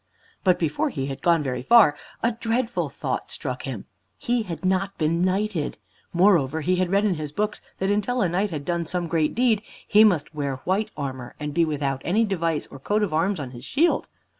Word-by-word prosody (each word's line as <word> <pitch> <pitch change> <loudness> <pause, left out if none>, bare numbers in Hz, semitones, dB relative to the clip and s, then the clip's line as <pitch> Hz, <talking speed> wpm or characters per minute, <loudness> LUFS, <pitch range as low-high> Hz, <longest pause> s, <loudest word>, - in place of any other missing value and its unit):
But 185 -2 +4
before 155 -3 0
he 135 -3 -3
had 135 -1 -5
gone 170 -3 +3
very 125 -2 -2
far, 200 - +6 0.3
a 235 - +3
dreadful 235 +1 -1
thought - - -4
struck - - -4
him. - - -5 0.3
He 245 -3 0
had 185 -3 -6
not 190 +1 0
been 165 +1 +1
knighted! 185 -3 0 0.3
Moreover, 170 -5 +3
he 180 +4 +1
had 185 -1 +1
read 200 +3 +2
in 200 - +2
his 155 -3 -5
books 210 +7 -2 0.2
that 190 +1 0
until 215 +4 +1
a - - +3
knight 190 +5 0
had 150 -5 -5
done 170 -1 -1
some 175 +1 -1
great 160 -2 0
deed, 230 -3 +3 0.3
he 215 +1 +6
must 175 -8 +2
wear 140 -3 -2
white 205 +4 +1
armor, 130 -4 -5
and 150 -1 -4
be 170 +1 +3
without 140 -3 -2
any 215 +6 +2
device 165 -6 -1
or 135 - -10
coat 210 +9 0
of 195 - -1
arms 180 +4 +1
on 135 -4 -5
his 120 -1 -10
shield. 330 - +1
175 Hz, 210 wpm, -24 LUFS, 150-210 Hz, 0.3 s, far